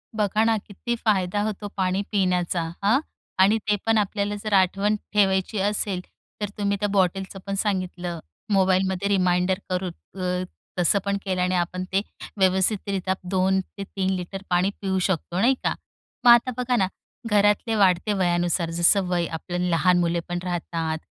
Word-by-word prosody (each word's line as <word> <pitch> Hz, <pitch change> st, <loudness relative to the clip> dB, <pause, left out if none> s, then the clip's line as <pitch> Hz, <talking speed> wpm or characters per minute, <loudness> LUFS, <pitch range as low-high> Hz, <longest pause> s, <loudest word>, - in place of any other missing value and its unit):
बघा 210 Hz, 0 st, +1 dB
ना, 225 Hz, 0 st, +3 dB
किती 210 Hz, +4 st, -5 dB
फायदा 200 Hz, -2 st, +1 dB
होतो 210 Hz, -1 st, -3 dB
पाणी 185 Hz, 0 st, +1 dB
पिण्याचा, 180 Hz, -4 st, +1 dB, 0.2 s
हं 220 Hz, +7 st, +4 dB, 0.4 s
आणि 200 Hz, +4 st, +5 dB
ते 210 Hz, -, +4 dB
पण 225 Hz, 0 st, +3 dB
आपल्याला 205 Hz, 0 st, 0 dB
जर 215 Hz, -1 st, -2 dB
आठवण 195 Hz, +2 st, +3 dB, 0.2 s
ठेवायची 195 Hz, 0 st, +2 dB
असेल, 200 Hz, -1 st, 0 dB, 0.4 s
तर 205 Hz, -, -1 dB
तुम्ही 200 Hz, -1 st, 0 dB
त्या 205 Hz, -, +1 dB
बॉटलचं 195 Hz, 0 st, 0 dB
पण 195 Hz, -, -1 dB
सांगितलं. 185 Hz, -4 st, -2 dB, 0.3 s
मोबाईलमध्ये 190 Hz, 0 st, +2 dB
रिमाइंडर 185 Hz, -1 st, +2 dB
करून 185 Hz, 0 st, -1 dB, 0.3 s
अ, 180 Hz, 0 st, -1 dB, 0.4 s
तसं 180 Hz, +3 st, +4 dB
पण 200 Hz, 0 st, 0 dB
केल्याने 185 Hz, -1 st, 0 dB
आपण 180 Hz, +1 st, -1 dB
ते 195 Hz, -, +3 dB, 0.4 s
व्यवस्थितरित्या 190 Hz, 0 st, +1 dB, 0.2 s
2 190 Hz, 0 st, +2 dB
ते 195 Hz, +2 st, -9 dB
3 190 Hz, -1 st, -2 dB
लिटर 185 Hz, +2 st, -5 dB
पाणी 180 Hz, +2 st, +2 dB
पिऊ 190 Hz, -1 st, 0 dB
शकतो, 175 Hz, -1 st, -2 dB
नाही 250 Hz, +6 st, +4 dB
का? -, -, +1 dB, 0.5 s
मग 240 Hz, -, +10 dB
आता 240 Hz, +2 st, +5 dB
बघा 250 Hz, 0 st, 0 dB
ना, 190 Hz, -5 st, +2 dB, 0.4 s
घरातले 210 Hz, +2 st, +3 dB
वाढते 195 Hz, 0 st, +3 dB
वयानुसार 175 Hz, -2 st, +1 dB
जसं 190 Hz, +3 st, +5 dB
वय, 175 Hz, -1 st, 0 dB
आपलं 175 Hz, +2 st, -3 dB
लहान 175 Hz, +1 st, +3 dB
मुले 170 Hz, 0 st, +1 dB
पण 175 Hz, 0 st, -2 dB
राहतात, 165 Hz, -3 st, -2 dB
190 Hz, 155 wpm, -24 LUFS, 180-205 Hz, 0.5 s, मग